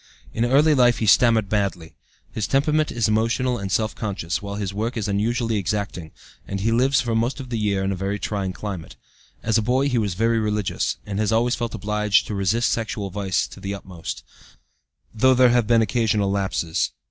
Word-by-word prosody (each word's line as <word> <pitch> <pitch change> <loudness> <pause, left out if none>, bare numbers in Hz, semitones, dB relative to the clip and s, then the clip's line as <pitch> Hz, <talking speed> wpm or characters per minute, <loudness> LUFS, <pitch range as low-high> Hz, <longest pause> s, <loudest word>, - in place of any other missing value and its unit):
In 115 - 0
early 145 +5 +4
life 120 -3 +4
he 110 - -1
stammered 110 -1 +4
badly; 95 -5 -2 0.4
his 110 - -2
temperament 150 +3 +1
is 115 -2 0
emotional 115 +3 +1
and 100 -1 -5
self 110 +2 0
conscious, 100 -6 -3
while 100 0 -5
his 100 -2 -3
work 115 +5 -3
is 110 - -2
unusually 115 +3 0
exacting, 100 -4 -3 0.4
and 100 - -3
he 110 +4 0
lives 130 +5 +3
for 120 -3 -2
most 120 +5 0
of 130 -2 -8
the 115 - -1
year 100 -2 0
in 95 - 0
a - - -1
very 100 +2 -2
trying 100 -1 -3
climate. 95 -3 -7 0.5
As 110 0 +2
a - - 0
boy 130 +5 +1
he 125 -3 +1
was 100 -5 -1
very 115 +3 +2
religious, 105 -2 -1
and 100 -1 -4
has 110 0 +1
always 120 +2 +2
felt 120 -3 -3
obliged 105 0 +1
to - - -5
resist 100 +5 +1
sexual 110 -3 -3
vice 95 -1 -1
to - - -12
the 100 +1 -4
utmost, 90 -4 -7 0.9
though 130 +4 +4
there 125 0 +6
have 120 -2 +2
been 115 -1 +4
occasional 105 -3 +1
lapses. 95 -4 -1
110 Hz, 200 wpm, -23 LUFS, 100-120 Hz, 0.9 s, there